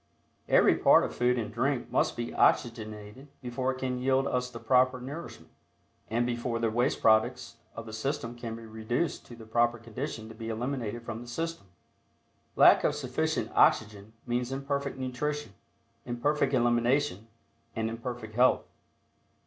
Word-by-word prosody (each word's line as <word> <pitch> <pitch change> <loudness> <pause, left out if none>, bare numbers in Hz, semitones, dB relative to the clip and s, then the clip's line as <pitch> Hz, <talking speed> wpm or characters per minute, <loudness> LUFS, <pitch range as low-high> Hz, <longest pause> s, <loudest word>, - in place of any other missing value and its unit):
Every - - +5
particle - - +5
of - - -11
food 125 +1 +2
and 110 -2 -3
drink 130 +2 -1
must - - +1
be 120 0 -4
oxygenated 110 +2 0
before 130 +1 -2
it 130 - -6
can 130 -1 -2
yield 135 +1 +2
us 125 -2 -1
the 120 -2 -9
proper 130 0 +3
nourishment, 145 +7 -8 0.6
and 120 +2 +1
before 120 -1 -2
the 115 -1 0
waste 120 +4 0
products 110 0 +2 0.2
of 115 - -7
the 110 - -9
system 115 +1 -3
can 115 -1 -6
be 115 0 -10
reduced 110 +8 -3
to 120 - -10
the 115 -1 -12
proper 120 +2 +2
condition 115 0 -6
to 110 - -10
be 115 0 -7
eliminated 120 -1 -3
from 115 -1 -6
the 120 - -10
system. 165 -1 -4 0.9
Lack - - +7
of - - +2
sufficient - - -2
oxygen 105 0 +2
means 120 +1 -1
Imperfect 140 0 -3
nutrition, 130 0 -3 0.5
Imperfect 135 +3 0
elimination 120 -1 +1 0.5
and 110 0 -1
imperfect 115 -1 -6
health. 125 +3 +4
120 Hz, 155 wpm, -29 LUFS, 115-130 Hz, 0.9 s, Lack